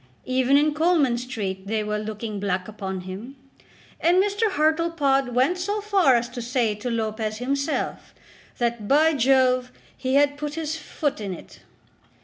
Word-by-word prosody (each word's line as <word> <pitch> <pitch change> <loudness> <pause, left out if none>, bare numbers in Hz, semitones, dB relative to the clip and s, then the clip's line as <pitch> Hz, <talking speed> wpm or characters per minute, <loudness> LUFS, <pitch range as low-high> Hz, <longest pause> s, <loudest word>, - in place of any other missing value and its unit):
Even 260 +2 +3
in 300 +1 +3
Coleman 310 -5 +3
Street 200 -6 -5
they 215 0 0
were 210 0 -2
looking 215 0 -5
black 185 -2 -2
upon 190 -3 -5
him, 195 +9 -8 0.6
and 345 +2 +3
Mr. 410 +3 +2
Hartlepod 305 -6 +1
went 275 +9 +2
so 405 +4 -1
far 395 -10 +3
as 240 0 +1
to 245 0 -6
say 235 -2 0
to 210 +4 -5
Lopez 220 -1 -2
himself, 275 +5 -2 0.4
that, 235 -4 -1
"by 310 +5 +4
Jove, 255 -1 +3 0.2
he 260 0 -1
had 285 0 +3
put 295 0 -4
his 320 -1 -3
foot 290 -5 -3
in 195 -3 -4
it." - - -14
255 Hz, 155 wpm, -24 LUFS, 220-305 Hz, 0.6 s, by